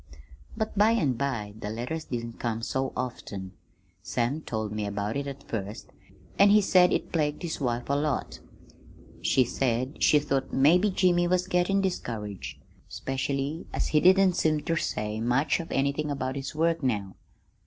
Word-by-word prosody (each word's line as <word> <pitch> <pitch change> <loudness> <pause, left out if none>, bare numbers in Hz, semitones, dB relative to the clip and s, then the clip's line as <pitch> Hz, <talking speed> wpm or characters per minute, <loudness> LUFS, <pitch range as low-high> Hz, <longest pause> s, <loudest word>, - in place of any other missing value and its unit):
"But 220 -1 -2
by 210 +3 +5
an' 155 - +2
by 115 -5 -3
the 105 - -4
letters 125 +9 -4
didn't 115 -1 -5
come 115 -1 -2
so 130 +2 -1
often. 105 -6 -5 0.5
Sam 125 +6 -1
told 110 -6 -3
me 105 -1 -2
about 100 +2 -3
it 140 0 -2
at 140 0 -7
first, 105 -1 -5 0.5
an' 200 - +7
he 210 +1 +7
said 185 -3 +5
it - - -1
plagued 150 0 -1
his 165 -3 -4
wife 120 -2 -1
a 140 - 0
lot. 145 0 -1 0.8
He 130 - +3
said 130 +2 -1
she 150 - +6
thought 140 -2 -1
maybe 170 +9 +4
Jimmy 180 -2 +3
was 180 0 +1
gettin' 185 +2 +2
discouraged, 110 - -4 0.3
specially 135 +4 -3
as - - -1
he 155 - +4
didn't 190 0 +6
seem 155 -3 +1
ter 165 - -1
say 105 -8 -2
much 130 +7 +2
of 165 - -7
anything 140 +2 0
about 135 -2 -2
his 140 +2 -5
work 165 +1 +1
now. 105 -8 -1
140 Hz, 165 wpm, -27 LUFS, 115-165 Hz, 0.8 s, an